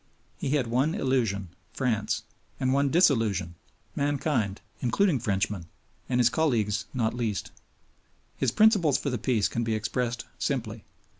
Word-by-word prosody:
He - - -2
had 135 -4 +1
one 130 +8 +1
illusion 110 -8 0 0.2
France; 115 -5 -1 0.4
and 130 0 +1
one 140 0 +3
disillusion 115 - +2 0.4
mankind, 140 -8 0 0.2
including 145 - +2
Frenchmen, 100 -5 -1 0.4
and 125 -1 +1
his 120 -1 +4
colleagues 115 -10 +1
not 115 -4 0
least. 115 -4 -2 0.8
His 135 - +1
principles 190 - +4
for 140 - -3
the 125 - -2
peace 110 -3 +1
can 120 - -2
be 110 -1 0
expressed 120 +2 -2
simply. 115 -6 -2
120 Hz, 135 wpm, -27 LUFS, 110-140 Hz, 0.8 s, his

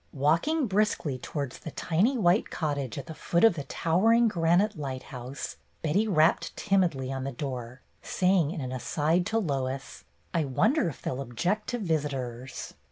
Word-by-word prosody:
Walking 170 - +2
briskly 195 - 0
towards 140 -1 -4
the - - -7
tiny 195 - +1
white 185 -1 +3
cottage 145 -6 -2
at 140 - -5
the 160 - -7
foot 170 +2 0
of 225 - +7
the 145 -4 -5
towering 220 - +3
granite 185 +2 +2
lighthouse, 130 -2 -6 0.3
Betty 190 +8 +2
rapped 165 -4 +2
timidly 170 -10 +1
on 135 -1 -3
the 135 - -3
door, 125 -2 -5 0.2
saying 180 -4 +2
in 160 - -4
an 130 -1 -4
aside 150 +8 0
to 225 - 0
Lois: 135 -8 -2 0.3
"I 165 -2 +2
wonder 215 - +2
if 145 - -11
they - - -1
'll 130 +1 -3
object 175 - -1
to 245 - -1
visitors." 135 - -3
155 Hz, 165 wpm, -28 LUFS, 135-195 Hz, 0.3 s, of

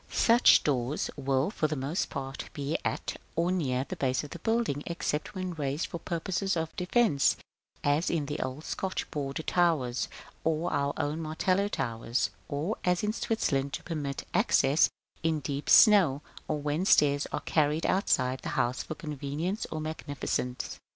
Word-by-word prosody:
Such 235 +2 +5
doors 135 0 0
will, 135 +4 0
for 155 - 0
the 155 - -2
most 145 +7 -2
part, 135 0 -5
be 145 +2 -2
at, - - -2 0.2
or 170 +2 +1
near, 135 -8 0
the - - -4
base 130 0 0
of 145 - -9
the 170 - -7
building; 225 -8 0
except 170 0 -2
when 185 -1 -3
raised 145 0 -2
for 170 - -6
purposes 185 +3 -1
of 160 0 -3
defence, 180 - +3 0.5
as 145 +4 +2
in 160 -4 0
the 145 +1 -4
old 130 +4 -4
Scotch 190 -1 -3
border 140 0 -3
towers, 155 -10 +1 0.3
and 160 +1 0
our 140 -2 0
own 150 +3 -1
Martello 185 +5 +1
towers, 120 - -1 0.2
or, 155 +10 -2
as 180 +1 +1
in 210 0 +1
Switzerland, 140 -13 0
to - - -4
permit 145 -5 -4
access 145 +4 +4 0.3
in 160 -1 +1
deep 140 0 -4
snow, 170 -10 +7 0.2
or 155 - -1
when 150 +4 -1
stairs 145 -6 +4
are - - -2
carried 155 0 +1
up - - +3
outside 130 -9 +1
the - - -5
house 125 +2 +1
for 155 - -6
convenience 150 +6 -3
or 155 - -4
magnificence. 145 -5 -3
150 Hz, 165 wpm, -29 LUFS, 140-175 Hz, 0.5 s, snow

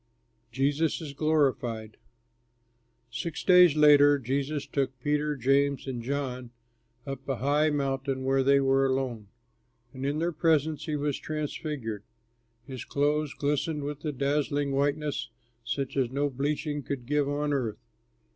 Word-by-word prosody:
JESUS 145 +5 +1
IS 155 -4 -7
GLORIFIED 130 -8 0 1.1
Six 155 +8 -4
days 180 -4 +7
later 145 -1 +6
Jesus 140 +3 -2
took 135 -2 -2
Peter, 150 +2 0
James 140 +2 +1
and 130 -3 -4
John 130 -1 -3 0.6
up 135 -1 -7
a 135 - +1
high 145 +4 +2
mountain 135 -2 -1
where 135 +1 +2
they 140 +1 +4
were 135 0 +3
alone, 130 -5 -2 0.7
and 130 0 -7
in 140 +2 0
their 170 +2 0
presence 155 -2 +1
he 155 - -1
was 145 -1 -1
transfigured. 150 -7 -4 0.6
His 130 -1 -7
clothes 145 +1 0
glistened 150 +1 -1
with 145 0 -5
a 155 - -1
dazzling 145 +1 0
whiteness 140 -2 -1 0.3
such 135 +3 -3
as 130 -3 +1
no 140 +2 -1
bleaching 145 +2 -2
could 135 -3 -5
give 145 +1 +1
on 145 0 -1
earth. 115 -6 -1
140 Hz, 135 wpm, -28 LUFS, 135-150 Hz, 1.1 s, days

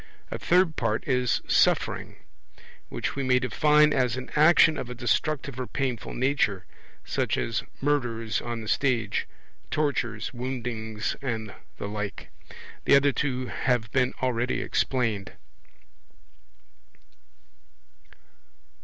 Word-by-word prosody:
A - - -4
third 180 -2 +3
part 115 -1 -1
is 125 -3 +1
Suffering; - - +2 0.7
which - - -3
we 140 - -2
may 130 -1 +3
define 150 +4 +4
as 125 -2 +1
an 130 0 -7
action 155 +1 +6
of 120 - -5
a 125 - -6
destructive 135 +2 -1
or 130 - -3
painful 130 -4 -3
nature, 125 -7 +1 0.4
such - - 0
as 115 0 -1 0.2
murders 120 -7 0
on 120 -1 -4
the 110 - -8
stage, 115 -5 0 0.4
tortures, 125 -8 -1
woundings, 120 -3 -3
and 110 -6 -3 0.2
the - - -4
like. 105 -1 -5 0.5
The - - +6
other 140 +1 +5
two 130 -2 -1
have 120 -2 -1
been 130 -1 +1
already 125 -1 0
explained. 115 -7 -1
125 Hz, 115 wpm, -27 LUFS, 115-140 Hz, 0.7 s, action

